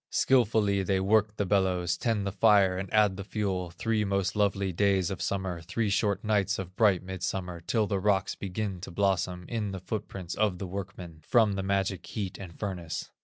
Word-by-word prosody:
Skilfully 110 -6 +3
they 95 0 +1
work 105 +2 +2
the 100 - 0
bellows, 90 -3 +1
Tend 110 -3 -1
the 100 - -1
fire 100 -3 +4
and 95 0 -5
add 105 -3 +3
the 100 - -5
fuel, 95 -3 -2
Three 110 +5 -1
most 100 -1 0
lovely 100 -2 +1
days 95 -1 +2
of 95 - -5
summer, 95 -3 -2
Three 100 +5 -1
short 100 0 +1
nights 105 -2 +1
of 95 -1 -6
bright 100 -5 +3
midsummer, 90 -1 -4
Till 110 +5 +1
the 100 -1 -1
rocks 100 0 +1
begin 95 -1 -4
to 95 - -7
blossom, 90 -1 0
In 105 -4 -3
the 95 - -4
foot 100 +4 -4
prints 90 -3 -6
of 105 -4 +1
the 95 - -5
workmen, 90 -3 -7
From 110 +4 +3
the 95 - -2
magic 95 -1 -1
heat 95 +1 -5
and 90 -4 -9
furnace. 90 -6 -4
95 Hz, 195 wpm, -29 LUFS, 90-105 Hz, -, fire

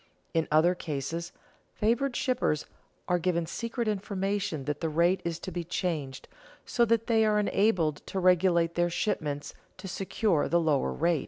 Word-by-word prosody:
In 165 -1 +1
other 155 +4 +4
cases 165 +1 -4 0.4
favored 240 +4 +1
shippers 245 - 0 0.4
are 180 0 +2
given 170 -1 0
secret 230 +5 -3
information 195 -6 -2
that 150 +1 -3
the 165 - 0
rate 170 +4 +2
is 170 -1 -2
to 185 - -7
be 175 0 -3
changed, 155 -6 -3 0.4
so 240 - +2
that 230 0 +2
they 225 -2 +3
are 215 -1 +3
enabled 195 -7 +2
to 190 - -2
regulate 175 -2 +3
their 175 0 +1
shipments 150 -5 -2 0.2
to 195 - -8
secure 190 -2 0
the 170 - +3
lower 150 - +1
rate. 165 - +1
175 Hz, 160 wpm, -29 LUFS, 160-205 Hz, 0.4 s, other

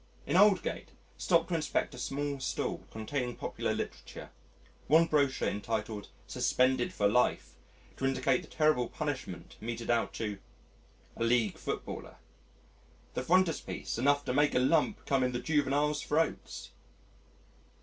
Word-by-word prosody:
In - - -1
Aldgate, 200 0 +3 0.2
stopped 170 -1 +2
to - - -2
inspect 155 -2 -1
a 125 - -9
street 140 +2 -3
stall 130 - -3
containing 120 +2 -3
popular - - -3
literature - - -6 0.6
one 160 +4 +6
brochure 140 -4 +1
entitled 105 0 -3 0.2
Suspended 130 -1 +1
for 100 - +2
Life 125 +4 +1 0.4
to 135 - -2
indicate 130 -1 +1
the - - -13
terrible 150 -6 +2
punishment 135 -11 -5
meted 115 +1 -3
out 115 -1 +1
to, 105 -3 -4 0.8
a - - -2
League 115 -4 +2
footballer. - - -5 1.0
The - - -2
frontispiece 170 -5 +1
enough 145 +3 +3
to - - -1
make 145 +2 +3
a - - +5
lump 160 +10 +2
come 135 -2 +2
in 125 0 +1
the 120 - -1
juveniles' 150 0 +1
throats! 160 +2 -1
135 Hz, 135 wpm, -31 LUFS, 120-150 Hz, 1.0 s, one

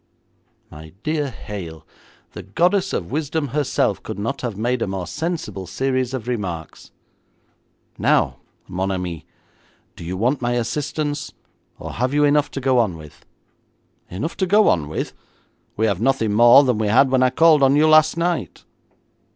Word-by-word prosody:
'My 80 +1 -12
dear 150 -2 -1
Hale, 95 - -8 0.5
the - - -8
goddess 180 - +1
of 85 +3 -4
Wisdom 150 0 -2
herself 145 0 0
could - - -7
not 115 +7 -3
have 115 -6 -4
made 120 +3 -1
a - - 0
more 95 -2 -4
sensible 155 - -4
series 130 +3 -1
of 120 -2 -6
remarks. 90 -10 -5 1.1
Now, - - +2 0.3
mon 95 +2 -2
ami, 90 -4 -4 0.7
do - - -10
you 90 +3 -4
want 125 +7 0
my 120 0 0
assistance, 145 +4 -3 0.4
or - - -7
have 125 +4 -1
you 150 - +3
enough 145 0 +3
to - - -5
go 130 -1 +2
on 100 -8 0
with?' 75 -2 -15 0.8
'Enough 135 - -5
to 190 - 0
go 210 +3 +4
on 75 -4 0
with? 80 - -4 0.6
We 110 - +2
have 100 -3 0
nothing 120 -4 +1
more 120 +5 +7
than 125 -5 0
we 110 - 0
had 130 +5 +4
when 130 -1 +3
I 130 - +4
called 160 +1 +4
on 135 0 +4
you 155 +2 +4
last 155 +1 +5
night.' 170 - -2
125 Hz, 165 wpm, -21 LUFS, 100-145 Hz, 1.1 s, more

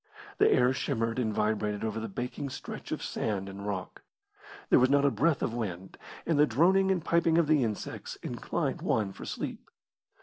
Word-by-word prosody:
The - - +6
air 125 +1 +4
shimmered 115 -3 -1
and 110 -3 0
vibrated 105 0 -1
over 110 0 -2
the 110 0 -5
baking 125 +6 -4
stretch - - -8
of - - -3
sand 100 -3 -2
and 100 +1 -7
rock. 95 -3 -4 0.7
There - - +7
was 130 +1 +4
not 140 0 +4
a 140 - +4
breath 140 +7 +1
of 115 - -1
wind, 95 -6 -5 0.3
and 160 -3 +1
the 150 - +6
droning 185 +10 +4
and 180 -4 0
piping 170 -1 +3
of 170 - +4
the 150 -3 +3
insects 110 -3 -4
inclined - - -2
one 105 -3 0
for - - -9
sleep. - - -5
120 Hz, 190 wpm, -29 LUFS, 105-145 Hz, 0.7 s, There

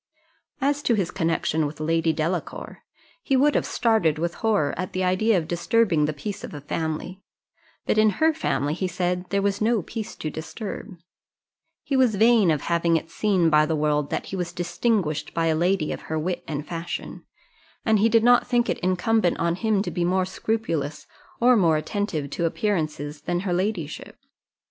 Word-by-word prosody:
As 285 +1 +1
to 240 - +2
his 195 -5 -1
connexion 165 -3 0
with 150 +1 -9
Lady 165 +1 +1
Delacour, 165 +2 -3 0.4
he 270 - +1
would 290 +3 +4
have - - 0
started 220 -10 +2
with 170 +2 -2
horror 205 -11 +1
at 185 +2 -5
the 185 - -1
idea 185 +4 +2
of 160 -3 -2
disturbing 175 -1 +2
the 150 - 0
peace 195 +8 -6
of - - -7
a 145 - -7
family; 160 +5 -4 0.6
but 215 - +2
in 215 0 +5
her 320 0 +4
family, 145 - -1
he 185 +3 -2
said, 180 0 -2
there 200 0 0
was 200 0 0
no 220 -3 +2
peace 220 +3 -6
to 155 - -5
disturb; 190 +4 -7 0.9
he 275 - -2
was 255 -5 +3
vain 220 -2 +5
of 155 -3 +1
having 170 -1 +2
it 165 +1 -7
seen 185 -6 +2
by 150 0 +5
the 160 - 0
world 150 -1 0
that - - -2
he - - -6
was 175 -2 -3
distinguished 175 -2 -1
by 165 - +1
a 160 -1 +2
lady 175 0 +1
of - - -5
her 160 - -1
wit 175 +2 -2
and 150 -1 -4
fashion, 170 +1 -6 0.6
and 220 -2 +3
he 225 +3 +4
did 225 0 +4
not 245 +1 +5
think 240 -1 +1
it - - -3
incumbent 185 +2 +1
on 170 0 +1
him 205 +1 0
to - - -4
be 175 - -1
more 185 +1 +1
scrupulous 185 -7 -3 0.3
or 245 +1 +5
more 165 -7 +3
attentive 160 -3 -2
to 170 - -1
appearances 155 -6 -2
than 175 +3 -2
her 185 -2 -1
ladyship. 180 -4 -3
180 Hz, 190 wpm, -24 LUFS, 160-215 Hz, 0.9 s, in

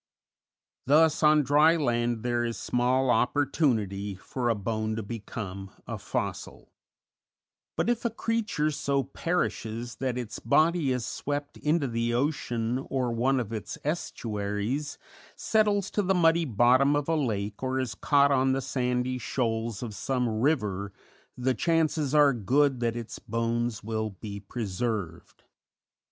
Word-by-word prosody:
Thus 155 +2 +4
on 150 -1 +5
dry 150 +4 +5
land 120 -6 0
there 120 -1 0
is 115 -1 -2
small 125 +1 +1
opportunity 110 - +1
for 120 +5 -3
a 115 - +2
bone 110 +1 -2
to 110 - -3
become 100 -3 -6 0.2
a - - -5
fossil; - - -4 1.0
but, - - 0
if 240 -1 0
a 235 - +1
creature 220 -9 -1
so 140 -1 0
perishes 120 -6 -3
that 130 -2 -2
its 115 -3 -5
body 155 +3 +2
is 125 -2 -1
swept 145 0 -4
into 150 -1 +1
the 115 0 -1
ocean 125 -3 -1
or 130 -3 0
one 130 +3 +1
of 115 -2 -4
its 110 - -5
estuaries, 115 -3 -3 0.4
settles 210 -2 +1
to 210 - +1
the 190 -1 +1
muddy 165 -1 +4
bottom 130 +4 +4
of 145 -1 -1
a 165 - +1
lake 105 -8 -2
or 130 0 -1
is 130 -5 -2
caught 140 +6 +3
on 130 -1 +3
the 135 - 0
sandy 125 0 -1
shoals 115 -2 -2
of 115 -3 -5
some 125 +2 -1
river, 105 -9 0 0.5
the 130 +1 +1
chances 155 -2 +1
are 145 -2 +6
good 130 +4 +2
that 120 -1 0
its 115 -2 -7
bones 115 -1 -2
will 110 0 -2
be 100 +1 -8
preserved. 100 -4 -4
125 Hz, 140 wpm, -28 LUFS, 115-145 Hz, 1.0 s, are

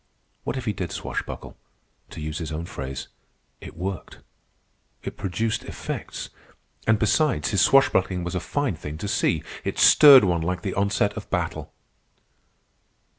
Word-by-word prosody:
What 130 - -2
if 130 - -5
he 105 - 0
did 90 -4 -4
swashbuckle? - - -5 0.5
To - - -9
use 75 +1 -4
his 80 -2 -5
own 80 +2 -4
phrase, 65 -5 -6 0.5
"it - - -11
worked," 95 +2 -5 0.9
it - - -6
produced 110 +4 -2
effects. - - -6 0.6
And, 110 -1 +4
besides, 125 +6 +1
his 100 -4 +2
swashbuckling 95 -8 +3
was 90 +1 -4
a 90 - -1
fine 140 - -2
thing 75 0 -7
to 100 +5 -5
see. 90 -6 +1 0.2
It - - -3
stirred 140 -5 +9
one 85 -3 +1
like 90 +2 -2
the 95 - -2
onset 100 +1 +1
of - - -8
battle. - - -3
95 Hz, 150 wpm, -24 LUFS, 85-110 Hz, 0.9 s, stirred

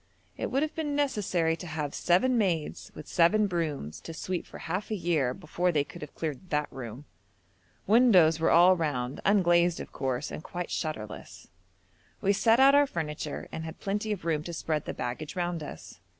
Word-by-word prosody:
It - - -3
would 270 +3 +1
have 310 - -3
been 295 -3 -2
necessary 190 - +1
to 175 - -8
have 150 -2 -3
'seven 220 +9 +2
maids 180 -9 -1
with 155 - -9
seven 205 +5 +4
brooms 155 - -3
to 165 - -8
sweep 180 +2 -4
for - - -10
half 185 +5 -4
a 215 - -1
year' 165 -8 +1
before 180 +7 -1
they 150 -4 +2
could - - -12
have 150 - -9
cleared 160 +3 -5
that 150 0 -1
room. 130 +1 -8 0.8
Windows 190 -8 +5
were 165 - +2
all 180 +2 +7
round, 140 -6 -2
unglazed 175 -4 +4
of - - -7
course, 130 +1 -2
and - - -6
quite 175 0 -5
shutterless. 110 -10 -5 0.7
We 200 - +2
set 225 +4 +4
out 270 +1 +7
our 285 0 +5
furniture 150 - -4
and 160 - -5
had 160 0 -8
plenty 210 +2 -2
of 195 -5 -4
room 160 -3 +1
to 170 - -5
spread 155 -2 -2
the - - -5
baggage 125 +5 -4
round 175 -2 -2
us. 145 - -9
170 Hz, 190 wpm, -28 LUFS, 150-195 Hz, 0.8 s, all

